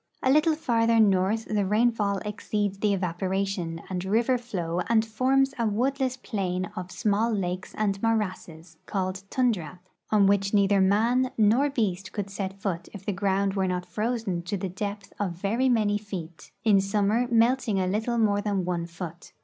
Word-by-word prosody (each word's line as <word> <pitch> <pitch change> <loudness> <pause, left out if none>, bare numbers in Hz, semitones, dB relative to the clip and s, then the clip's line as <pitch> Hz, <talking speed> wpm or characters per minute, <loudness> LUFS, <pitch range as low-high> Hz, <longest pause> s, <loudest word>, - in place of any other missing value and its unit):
A 260 - +4
little 305 +2 +4
farther 230 -6 +2
north 200 +1 +3
the 210 -1 0
rainfall 210 0 +1
exceeds 205 -1 -2
the 210 0 +2
evaporation 185 -2 -2
and 180 -1 -3
river 230 +6 +2
flow 180 -8 -3
and 225 -1 +3
forms 265 +5 +2
a 230 - +2
woodless 260 +4 0
plain 185 -6 -3
of 180 0 -5
small 215 +3 +1
lakes 185 -3 -3
and 200 -2 0
morasses, 185 -7 -2
called 185 -1 -2
tundra, 195 - 0 0.3
on 210 -2 +4
which 195 +1 +2
neither 200 -1 +4
man 230 +7 +3
nor 230 +7 +4
beast 195 -8 -2
could 200 -2 -4
set 195 -1 -5
foot 175 -4 -3
if 195 -2 -10
the 205 - -1
ground 195 +1 0
were 190 -1 0
not 180 0 -2
frozen 210 -1 -2
to 175 +4 -3
the 190 0 -3
depth 200 +2 -5
of 195 -4 -1
very 215 +9 0
many 210 -4 +2
feet; 180 -6 -8
in 205 -3 +5
summer 210 +4 +1
melting 235 -2 +2
a 185 - +1
little 220 +5 -1
more 205 -3 +2
than 200 -3 -1
one 175 -1 -2
foot. 170 -1 -9
200 Hz, 170 wpm, -26 LUFS, 185-225 Hz, 0.3 s, in